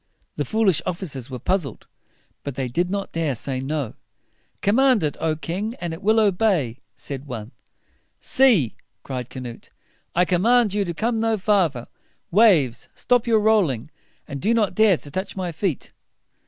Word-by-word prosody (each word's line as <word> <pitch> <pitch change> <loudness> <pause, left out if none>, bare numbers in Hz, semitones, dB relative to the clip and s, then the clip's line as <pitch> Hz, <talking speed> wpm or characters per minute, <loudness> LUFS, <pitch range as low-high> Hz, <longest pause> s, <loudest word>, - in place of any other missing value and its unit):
The - - -2
foolish 205 -7 +2
officers 145 -9 -4
were 130 - -5
puzzled, 175 - -2 0.6
but 140 -3 -5
they 130 -1 -2
did 175 +9 0
not 200 0 -3
dare 160 -4 -1
to - - -6
say 130 -2 -3
"No." 135 -2 -3 0.7
"Command 245 0 +4
it, 150 - 0
O 160 -1 0
king! 190 +9 -4
and 170 -2 -3
it 165 - -8
will 220 +2 +3
obey," 185 - +2 0.2
said 140 -1 -7
one. 115 -3 -6 0.7
"Sea," 230 - +3 0.3
cried 130 -3 -5
Canute, 125 -3 -8 0.5
"I 180 +1 +4
command 210 +5 +3
you 205 -1 +1
to 170 -2 -4
come 225 +3 0
no 225 0 +1
farther! 180 - +1 0.4
Waves, 170 - +4
stop 245 -1 +1
your 220 -2 +4
rolling, 175 - +2 0.4
and 140 -1 -6
do 230 +3 +2
not 215 -4 +1
dare 215 -5 +4
to 145 - -11
touch 190 +5 -4
my 180 -2 -2
feet!" 165 -2 -3
180 Hz, 165 wpm, -23 LUFS, 140-215 Hz, 0.7 s, Command